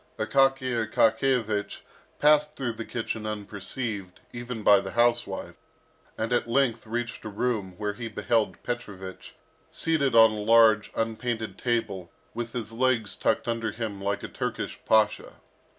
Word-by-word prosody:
Akaky 135 -2 +2 0.2
Akakiyevich 110 -2 +1 0.4
passed 150 0 +4
through 125 -3 -2
the 115 0 -7
kitchen 110 -2 -4
unperceived, 105 -1 -4
even 120 -2 -6
by 100 -1 +7
the 95 -1 -6
housewife, 120 0 +1 0.6
and 110 +2 -1
at 120 -1 0
length 120 -3 +1
reached 120 +1 -4
a 110 - -5
room 105 -4 -2
where 105 -1 -2
he 115 +2 -6
beheld 110 -3 -1
Petrovich 100 -6 -6 0.3
seated 150 -6 0
on 115 -1 +8
a 110 - -4
large 110 0 +5
unpainted 115 0 -2
table, 100 -7 -2 0.2
with 115 0 -5
his 115 -3 -4
legs 120 -2 +1
tucked - - 0
under 115 -1 -1
him 110 -4 -5
like 100 +1 -1
a - - -4
Turkish - - -4
pasha. 110 -1 +2
115 Hz, 140 wpm, -27 LUFS, 105-120 Hz, 0.6 s, on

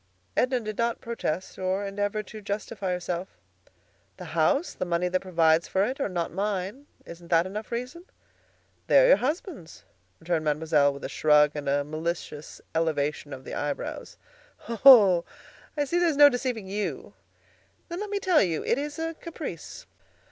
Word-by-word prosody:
Edna 255 0 +2
did 215 -1 -6
not 235 0 0
protest 190 -6 -4
or 190 +2 -1
endeavor 205 +2 -2
to 215 +2 -10
justify 200 -1 -4
herself. 180 0 -4 0.8
"The - - -8
house, 300 +3 +2
the - - -4
money 175 0 0
that 185 +1 +1
provides 165 -3 +2
for 190 - +1
it, 260 +5 -4
are 275 - -1
not 175 -3 -2
mine. 200 +7 -3 0.2
Isn't 170 0 -11
that 170 0 +3
enough 210 +3 -6
reason?" 250 +9 -5 0.8
"They - - +6
are - - +6
your - - +7
husband's," 290 - -4 0.4
returned 165 -1 -1
Mademoiselle, 150 -1 +2
with 140 0 -10
a - - -2
shrug 150 -1 +4
and 145 -2 -4
a 145 +1 +1
malicious 155 0 -5
elevation 150 -2 -1
of 130 -1 -8
the - - -8
eyebrows. 285 - -4 0.5
"Oh! 220 -7 +7 0.5
I 290 - +1
see 345 +5 0
there 350 -1 +3
is 295 - -2
no 290 0 +9
deceiving 245 -5 -3
you. 205 +2 -4 0.7
Then 345 +1 -5
let 415 0 -4
me 410 - -1
tell 370 -5 +3
you: 170 -5 0
It 250 - +1
is 290 0 -5
a 325 0 -3
caprice. 310 - -8
195 Hz, 170 wpm, -26 LUFS, 165-260 Hz, 0.8 s, no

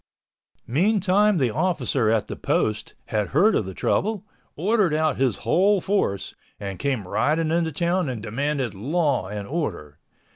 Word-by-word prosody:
Meantime 200 - +2
the 130 -6 +1
officer 140 -6 0
at 110 -1 +1
the - - -5
Post 110 0 -1
had 105 -2 0
heard 195 - +3
of 100 - 0
the 95 - -6
trouble, 215 0 0 0.3
ordered 195 -1 +2
out 155 -2 +1
his 130 -5 +1
whole 200 +3 +3
force, 175 - -1 0.3
and 100 -3 -6
came 130 -7 -1
riding 155 - +1
into 165 -1 +1
town 170 +1 0
and 115 -4 -5
demanded 135 +2 -2
law 140 - 0
and 100 0 -6
order. 90 - -4
145 Hz, 150 wpm, -24 LUFS, 110-180 Hz, 0.3 s, heard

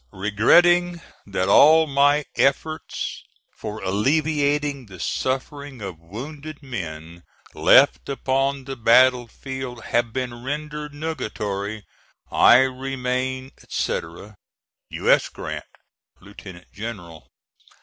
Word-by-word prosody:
Regretting 175 - +3 0.3
that 95 -2 -1
all 155 +10 +7
my 145 0 +3
efforts 155 +3 -1 0.3
for 110 0 -7
alleviating 145 +4 0
the 95 -3 -12
sufferings 135 - -3
of 95 -5 -7
wounded 140 - -9
men 85 - -7 0.3
left - - +4
upon 135 0 -1
the 135 +1 -6
battle 125 +1 +4
field 130 -2 -7
have 120 -1 0
been 120 -1 -5
rendered 150 +2 -5
nugatory, 105 - -4 0.5
I 125 - +7
remain, 130 0 -2 0.2
&c., - - -1 1.0
U. - - 0
S. - - +3
GRANT, - - -7 0.5
Lieutenant 95 -3 -13
General. 100 -7 -8
130 Hz, 100 wpm, -23 LUFS, 105-145 Hz, 1.0 s, all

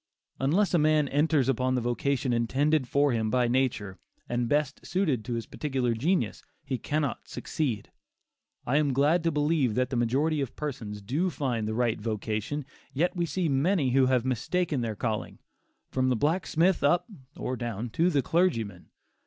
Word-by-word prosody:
Unless 180 +10 +2
a 175 - +4
man 155 -1 +3
enters 145 -2 +2
upon 130 0 +1
the - - +2
vocation 125 +2 0
intended 130 +4 +1
for 140 +1 +2
him 110 -2 0
by 125 +1 +2
nature, 120 -7 0 0.3
and 120 -1 -1
best 145 -1 0
suited 155 - 0
to 120 +2 -3
his 115 - -3
peculiar 130 -5 -1
genius, 160 +12 0 0.2
he 135 -3 -2
cannot 145 +1 -2
succeed. 125 -10 -3 0.7
I 135 +4 +2
am 145 -3 +2
glad 150 +6 +3
to 165 - +2
believe 145 -6 +1
that 125 +1 0
the - - -1
majority 140 +6 +1
of 135 - -4
persons 110 -9 -5
do 150 - 0
find 125 -10 -2
the 110 - -2
right 120 -3 0
vocation. 110 +6 -3 0.3
Yet 175 +7 0
we 175 -1 0
see 165 +3 -1
many 145 0 +2
who 130 0 +4
have 130 -2 +2
mistaken 135 +4 0
their 115 -2 -2
calling, 110 -1 -3 0.5
from 130 0 +1
the 125 - +2
blacksmith 165 - +1
up 160 +5 +3 0.3
(or 130 - -3
down) 120 -1 -4
to 170 +9 +2
the 145 -6 +1
clergyman. 115 - 0
135 Hz, 170 wpm, -28 LUFS, 120-155 Hz, 0.7 s, a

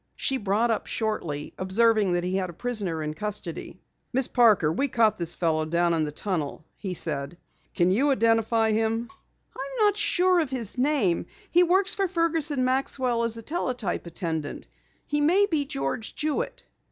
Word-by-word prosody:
She 270 - 0
brought 215 +2 +1
up 220 - -2
shortly, 170 -10 -3
observing 205 +1 +3
that 175 0 0
he 180 +1 -2
had 185 -2 -2
a - - -8
prisoner 195 -7 -2
in 150 0 -3
custody. 205 -2 -6 0.3
"Miss 260 0 +2
Parker, 215 -11 +4
we 275 +11 0
caught 225 -5 +2
this 170 0 -1
fellow 160 -2 0
down 170 +2 +1
in 160 -2 +1
the 150 - -4
tunnel," 155 -3 -4
he 190 -3 -5
said. 150 0 -1 0.4
"Can 175 +1 +3
you 265 +9 +2
identify 225 -3 +2
him?" 225 +2 0 0.5
"I'm - - -1
not 410 0 +2
sure 365 -3 +3
of 315 -5 0
his 240 -6 -2
name. 250 - +1 0.2
He 350 - +5
works 370 +2 +4
for 390 -1 0
Fergus 330 -3 0
and 265 -4 0
Maxwell 255 -2 0
as 230 -1 -1
a 230 - -8
teletype 250 - -2
attendant. 160 -3 -4 0.4
He 295 0 -1
may 360 +7 +4
be 315 -8 0
George 135 - -3
Jewitt." 460 +11 -2
225 Hz, 175 wpm, -26 LUFS, 175-280 Hz, 0.5 s, He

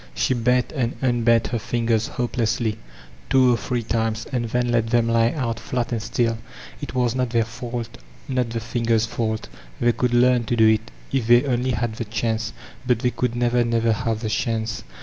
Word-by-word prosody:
She 130 - +1
bent 125 +1 +1
and 125 -5 -1
unbent 115 -2 +3
her 120 - -1
fingers 115 -1 0
hopeksslyt 120 -2 0 0.5
two 130 -2 +5
or - - +3
three 120 +3 -2
times, 110 0 -1
and 125 -3 -1
then 120 +2 0
let 115 -1 +2
them 115 0 +2
lie 115 0 +3
out 115 -5 -2
flat 125 -1 -3
and 115 -2 -1
stilL 115 0 0 0.4
It 145 - -6
was 125 -2 +2
not 125 -1 0
their 115 -1 +2
fault, 115 0 -6 0.3
not 125 -3 0
the 115 0 -3
fingers' 115 -1 +1
fank; 110 -1 -2 0.4
they 120 - +4
could 120 +1 0
learn 125 -1 +4
to 120 - 0
do 110 -1 +5
it» 110 +1 +2 0.2
if 130 -5 0
they 120 +1 +6
only 125 -1 0
had 110 -1 -1
the 115 - -3
chance; 110 +1 -2 0.4
but 125 - +3
they 125 +2 0
could 125 -1 -1
never, 120 0 +2
never 115 -1 +1
have 110 +1 -2
the 110 - -2
chance. 110 +1 -1
115 Hz, 195 wpm, -23 LUFS, 115-125 Hz, 0.5 s, they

